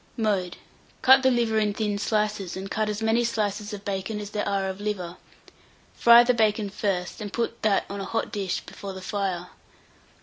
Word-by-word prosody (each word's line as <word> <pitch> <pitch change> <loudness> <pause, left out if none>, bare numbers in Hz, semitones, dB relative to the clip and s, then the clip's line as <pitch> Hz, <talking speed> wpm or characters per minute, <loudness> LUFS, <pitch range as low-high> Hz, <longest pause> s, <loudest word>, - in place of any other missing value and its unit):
Mode. 200 -6 0 0.5
Cut 265 +1 +8
the 260 - +4
liver 235 -3 +2
in 210 -1 0
thin 205 -2 -1
slices, 210 -3 -1
and 195 +1 -6
cut 215 0 0
as 210 +1 -3
many 225 +2 +3
slices 210 -2 -2
of 205 -1 -8
bacon 200 +2 -3
as 205 0 -7
there 210 -1 -2
are 195 -1 0
of 190 +1 -5
liver; 185 -4 -3 0.8
fry 235 0 +7
the 250 +1 +3
bacon 215 -3 +1
first, 195 -2 -2
and 205 -1 -5
put 235 +1 -3
that 210 -2 +2
on 200 0 -5
a - - -4
hot 225 +4 -2
dish 195 -3 -2
before 195 -1 -8
the 190 - -8
fire. 185 -4 -2
210 Hz, 195 wpm, -25 LUFS, 195-220 Hz, 0.8 s, Cut